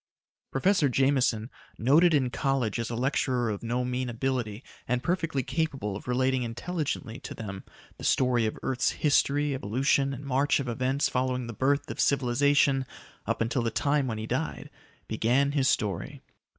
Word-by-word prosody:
Professor 165 +1 +2
Jameson, 130 -3 +1 0.3
noted 155 +9 +5
in 130 -4 +1
college 130 -6 0
as 115 - -2
a 115 - -3
lecturer 125 -1 0
of 100 - -5
no 120 +2 -1
mean 125 0 -2
ability 120 -2 -2 0.2
and 125 +1 0
perfectly 165 -6 0
capable 135 -12 -2
of 105 - -9
relating 130 +1 +1
intelligently 125 0 -3
to - - -8
them 100 -3 -7 0.4
the - - -9
story 125 -3 +2
of 110 - -3
the - - -12
earth's 130 -1 0
history, 145 -1 +2
evolution 135 +3 +1
and 135 +1 -7
march 140 +2 +2
of 135 - -3
events 130 +4 0
following 125 -1 -1
the 115 - -6
birth 140 +6 0
of - - -8
civilization 135 0 +3 0.4
up - - -1
until 115 +3 0
the 115 - 0
time 140 +3 +1
when 110 -3 -3
he 110 - -4
died, 130 +8 -3 0.4
began 125 +6 +2
his 140 -2 +1
story. 100 -8 -1
130 Hz, 165 wpm, -28 LUFS, 120-140 Hz, 0.4 s, noted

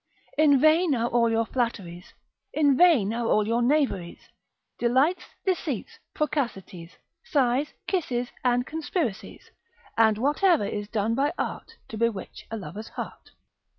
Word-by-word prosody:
In 290 -3 +5
vain 310 +1 +4
are 235 0 0
all 235 -1 +2
your 225 0 +1
flatteries, 200 -9 -4 0.4
In 290 -3 +3
vain 265 - +4
are 235 0 -2
all 210 -1 +2
your 230 +2 +1
knaveries, 245 - 0 0.5
Delights, 270 +9 +2 0.2
deceits, 365 - -2 0.2
procacities, 215 - -3 0.3
Sighs, 275 -1 0
kisses, 250 -10 -1
and 245 0 +2
conspiracies, 310 - -4 0.4
And 220 -2 +4
whate'er 295 - +2
is 205 0 -4
done 215 +1 -1
by 275 +4 +1
art, 460 - -5
To 220 - -6
bewitch 230 -5 -3
a 225 - -4
lover's 210 +1 -8
heart. - - -8
245 Hz, 130 wpm, -26 LUFS, 220-300 Hz, 0.5 s, In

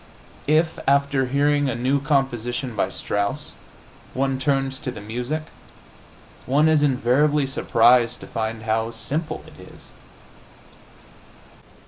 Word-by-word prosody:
If, 160 +2 +2
after 140 -1 +2
hearing 145 +1 +2
a 120 - -2
new 130 +4 0
composition 130 -3 -1
by 100 - 0
Strauss, 105 +9 -3 0.6
one 135 0 0
turns 135 -1 0
to 140 - -5
the 125 - -7
music, 125 +9 -4 1.0
one 145 +4 +3
is 155 -2 +4
invariably 145 +2 +2
surprised 120 -2 +3
to - - -8
find 110 -1 -4
how 110 0 0
simple 125 +8 -4
it - - -16
is. - - -15
135 Hz, 115 wpm, -23 LUFS, 120-145 Hz, 1.0 s, is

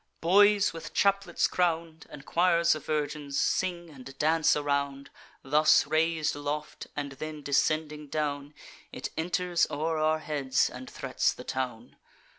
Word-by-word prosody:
Boys 205 +4 +4
with 165 - -9
chaplets 200 -3 +2
crown'd, 165 -2 -1
And 145 -1 -11
choirs 170 -1 +3
of 155 - -7
virgins, 150 -2 -2
sing 175 -3 -1
and 135 -1 -12
dance 160 +2 +3
around. 140 -1 -2 0.3
Thus 150 +3 +4
rais'd 160 -1 +1
aloft, 145 +1 -5
and 145 -1 -4
then 155 +2 -7
descending 150 +2 0
down, 145 -1 -3 0.4
It - - -6
enters 175 +1 0
o'er 155 +2 -2
our 155 0 +2
heads, 140 -4 0
and 130 +1 -9
threats 135 -1 -1
the - - -10
town. 125 -3 -5
155 Hz, 135 wpm, -28 LUFS, 140-165 Hz, 0.4 s, Boys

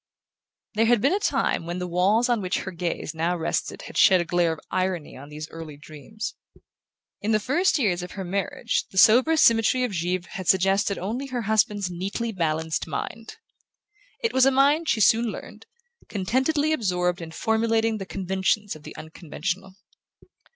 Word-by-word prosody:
There 225 +1 +2
had 240 -1 +4
been 275 - +2
a 400 - +1
time 170 - 0
when 175 +1 -3
the 180 - -3
walls 190 +7 +2
on 240 -3 +1
which 185 -1 -1
her 190 - -6
gaze 170 -1 -4
now 165 +2 -1
rested 165 - -3
had - - -4
shed 190 -3 +6
a 175 - -1
glare 175 -1 +1
of 160 - -9
irony 185 -4 -2
on 140 +2 -11
these 155 +1 -7
early 160 -3 -9
dreams. 155 +9 -8 0.9
In 215 +2 0
the 215 - +3
first 330 - +1
years 195 -10 +1
of 180 - -8
her 195 - -5
marriage 190 +2 -2
the 190 - -11
sober 250 +11 +6
symmetry 230 -2 +4
of 250 - -1
Givre 180 0 -2
had 190 -4 -6
suggested 195 +2 +2
only 230 +9 -4
her 250 -3 -3
husband's 210 -3 +1
neatly 200 +6 -3
balanced 160 -4 -1
mind. 220 +9 -6 0.9
It 460 - 0
was 260 0 +5
a - - +7
mind, 285 +4 +3
she 215 - +2
soon 225 +3 +4
learned, 220 - -7 0.4
contentedly 265 +10 0
absorbed 180 - 0
in 165 - -7
formulating 225 +4 0
the 195 - -6
conventions 190 +2 -1
of 155 - -12
the - - -11
unconventional. 180 +4 -5
195 Hz, 175 wpm, -25 LUFS, 175-225 Hz, 0.9 s, a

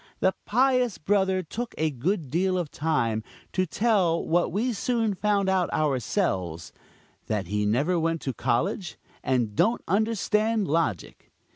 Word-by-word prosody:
The 190 - +3
pious 250 -1 +2
brother 190 +1 +1
took 235 +8 -5
a 160 0 +1
good 150 - -2
deal 185 +2 +1
of 170 -5 -3
time 120 -9 0 0.3
to 185 -1 +1
tell 190 -5 +1
what 175 +2 +1
we 230 +7 0
soon 225 -1 0
found 200 0 +1
out 190 -2 +1
ourselves 120 - -1 0.5
that 105 -3 -1
he 105 +3 -1
never 145 +11 +1
went 165 0 0
to 135 - -3
college 130 - -1 0.3
and 120 -5 0
don't 230 - +2
understand 215 +1 +1
logic. 145 - -2
180 Hz, 140 wpm, -26 LUFS, 130-205 Hz, 0.5 s, The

